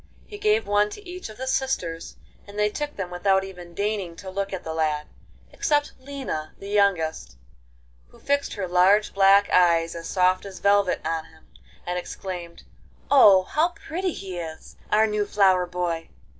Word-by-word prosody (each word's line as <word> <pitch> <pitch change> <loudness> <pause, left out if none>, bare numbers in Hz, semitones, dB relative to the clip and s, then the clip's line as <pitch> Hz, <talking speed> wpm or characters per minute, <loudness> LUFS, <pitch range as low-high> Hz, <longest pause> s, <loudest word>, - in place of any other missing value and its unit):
He 415 - -10
gave 425 +1 +2
one 205 0 +2
to 410 - -11
each 360 -6 -7
of 215 - -12
the 260 - -5
sisters, 220 -12 -2 0.3
and 205 +1 -11
they 210 0 +2
took 295 +5 -4
them 185 -3 -5
without 190 +2 +2
even 180 -3 -10
deigning 200 -4 -2
to 190 +1 -9
look 195 +1 -3
at 190 - -5
the 160 - -5
lad, 155 -2 0 0.5
except 290 -1 0
Lina 260 - -6
the 200 - -9
youngest, 195 - 0 0.7
who - - -20
fixed 280 0 -1
her 195 -3 -3
large 185 +4 +4
black 195 +1 +5
eyes 170 -2 +4
as 165 0 -7
soft 185 0 +2
as 195 -2 -9
velvet 200 -2 +2
on 165 -1 -2
him, 160 -1 -21 0.4
and 180 0 -2
exclaimed, 175 -2 -7 0.5
'Oh, 205 -9 +7
how 320 - 0
pretty 360 +2 -2
he 185 -2 -6
is—our 170 +6 -1
new 210 -1 -1
flower 190 -3 +3
boy! 175 -2 -3
195 Hz, 170 wpm, -24 LUFS, 175-215 Hz, 0.7 s, Oh